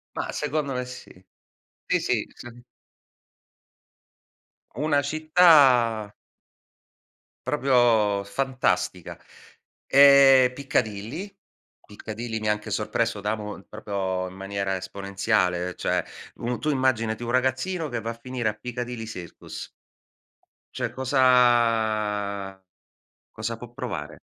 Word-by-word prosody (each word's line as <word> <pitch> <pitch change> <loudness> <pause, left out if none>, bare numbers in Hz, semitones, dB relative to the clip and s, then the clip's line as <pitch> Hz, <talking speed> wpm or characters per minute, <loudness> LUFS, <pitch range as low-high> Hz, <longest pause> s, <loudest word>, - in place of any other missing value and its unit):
Ma - - -3
secondo 150 -2 -2
me 125 0 -2
sì 125 0 -10 0.8
sì, - - +1
sì - - -1
sa 120 - -11 2.2
Una 145 +3 +1
città 140 - +4 1.3
proprio 120 -8 +3
fantastica. 130 +5 -2 0.7
Ehm 135 -2 +7
Piccadilly 130 - -3 0.5
Piccadilly 110 +2 -6
mi 105 - -3
anche 105 0 -2
sorpreso - - -1
da 105 +1 -1
mo 105 -2 -7
proprio 95 -3 -3
in 95 - -13
maniera 95 0 -3
esponenziale, 95 -2 -1
cioè - - -1 0.3
un 120 +1 -3
tu 155 - -1
immaginati 120 -5 0
un 120 - -3
ragazzino 130 +6 0
che 120 -2 -3
va 115 +1 -4
a - - -6
finire 125 -3 -3
a - - -3
Piccadilly 120 +1 -6
Circus 90 -6 -9 1.0
cioè - - -3
cosa 115 -6 +2 0.7
cosa 110 +1 -4
può 120 0 -11
provare? - - -6
120 Hz, 100 wpm, -25 LUFS, 105-130 Hz, 2.2 s, Ehm